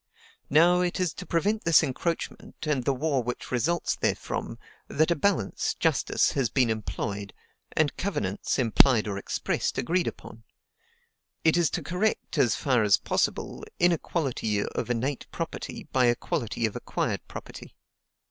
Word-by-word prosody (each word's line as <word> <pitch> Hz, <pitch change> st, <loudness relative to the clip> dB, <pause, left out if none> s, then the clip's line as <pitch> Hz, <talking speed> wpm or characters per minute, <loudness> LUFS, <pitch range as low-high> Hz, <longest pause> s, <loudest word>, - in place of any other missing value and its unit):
Now, 175 Hz, +4 st, +5 dB
it 180 Hz, 0 st, -1 dB
is 180 Hz, -3 st, 0 dB
to -, -, -9 dB
prevent 205 Hz, +6 st, +1 dB
this 165 Hz, -2 st, +5 dB
encroachment 165 Hz, +4 st, -3 dB
and 145 Hz, -5 st, 0 dB
the -, -, +3 dB
war 140 Hz, -1 st, 0 dB
which 125 Hz, +1 st, -5 dB
results 160 Hz, +8 st, +1 dB
therefrom, -, -, -2 dB, 0.3 s
that 155 Hz, +3 st, +2 dB
a -, -, +3 dB
balance 165 Hz, -, 0 dB
(justice) -, -, +2 dB
has 135 Hz, -5 st, 0 dB
been 125 Hz, -4 st, +2 dB
employed, 100 Hz, -2 st, -4 dB, 0.4 s
and 155 Hz, -2 st, +1 dB
covenants 105 Hz, -, -1 dB
(implied 120 Hz, -2 st, +4 dB
or 100 Hz, -1 st, -3 dB
expressed) -, -, -2 dB
agreed 175 Hz, +6 st, +1 dB
upon: 115 Hz, +1 st, -8 dB, 1.0 s
it 160 Hz, 0 st, +4 dB
is 175 Hz, -2 st, +3 dB
to -, -, -3 dB
correct, 180 Hz, -3 st, -1 dB
as 120 Hz, -4 st, +4 dB
far 130 Hz, -5 st, +2 dB
as 105 Hz, -2 st, +5 dB
possible, -, -, -1 dB
inequality 145 Hz, -, +1 dB
of -, -, -4 dB
innate 125 Hz, +4 st, -2 dB
property 165 Hz, -, -5 dB
by 130 Hz, -2 st, +4 dB
equality 120 Hz, -1 st, -1 dB
of 110 Hz, -, -2 dB
acquired -, -, -2 dB
property. -, -, -10 dB
140 Hz, 145 wpm, -27 LUFS, 115-170 Hz, 1.0 s, Now